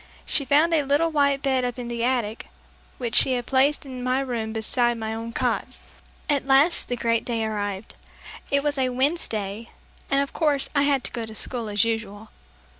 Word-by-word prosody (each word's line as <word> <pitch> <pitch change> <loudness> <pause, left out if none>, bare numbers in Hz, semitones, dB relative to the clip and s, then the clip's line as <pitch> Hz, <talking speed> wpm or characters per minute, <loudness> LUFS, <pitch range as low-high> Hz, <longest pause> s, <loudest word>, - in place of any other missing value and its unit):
She 280 - 0
found 305 +5 +4
a 315 - +4
little 290 +4 +1
white 280 -2 +2
bed 265 -2 +1
up 245 -1 -2
in 245 -1 -5
the 235 -1 -3
attic 240 -3 -1 0.5
which 235 -3 +3
was 250 -2 -1
placed 275 +4 +2
in 255 -2 -7
my 255 +1 +1
room 235 -4 -3
beside 235 +2 0
my 220 -1 -3
own 225 +1 -5
cot. - - -1 0.6
At 280 -3 +1
last 275 +6 +4
the 245 - -1
great 230 -1 0
day 230 -2 -1
arrived. 205 -1 -4 0.6
It 280 0 +2
was 290 -2 0
a 260 -1 +2
Wednesday, 230 - -1 0.4
and 275 - +3
of 280 0 -1
course 295 -4 +1
I 285 - +3
had 275 -3 +1
to - - -4
go 235 - -4
to 220 - -9
school 230 0 -1
as 205 -1 +2
usual. 220 -2 -3
250 Hz, 190 wpm, -24 LUFS, 225-280 Hz, 0.6 s, found